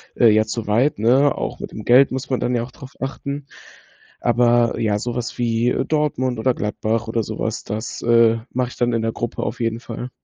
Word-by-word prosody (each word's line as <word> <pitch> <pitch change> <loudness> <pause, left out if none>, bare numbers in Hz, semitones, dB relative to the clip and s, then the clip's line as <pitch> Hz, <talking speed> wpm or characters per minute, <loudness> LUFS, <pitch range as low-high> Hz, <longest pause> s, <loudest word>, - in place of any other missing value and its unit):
äh, 120 -3 +6
ja, 110 +1 +4
zu 110 0 -4
weit, 120 +8 +2
ne? 130 +6 +4
Auch - - -4
mit - - -6
dem 105 - -8
Geld 130 +3 +6
muss 130 +1 -4
man 130 - 0
dann 125 0 0
ja 115 - 0
auch 120 - -9
drauf 135 0 -12
achten. 140 +1 -4 0.8
Aber 120 0 +3
ja, 105 -2 +1
sowas 120 +1 -4
wie 120 0 +1
Dortmund 135 -5 0
oder 130 +3 +2
Gladbach 110 +1 -2
oder 115 0 0
sowas, - - -3
das, 110 +2 -5
äh, 115 -1 +5
mache 125 -1 -1
ich - - -12
dann 120 0 +1
in 115 - +1
der 115 0 0
Gruppe 120 0 -3
auf - - -4
jeden 115 -1 -1
Fall. 120 +1 -7
120 Hz, 210 wpm, -21 LUFS, 115-125 Hz, 0.8 s, äh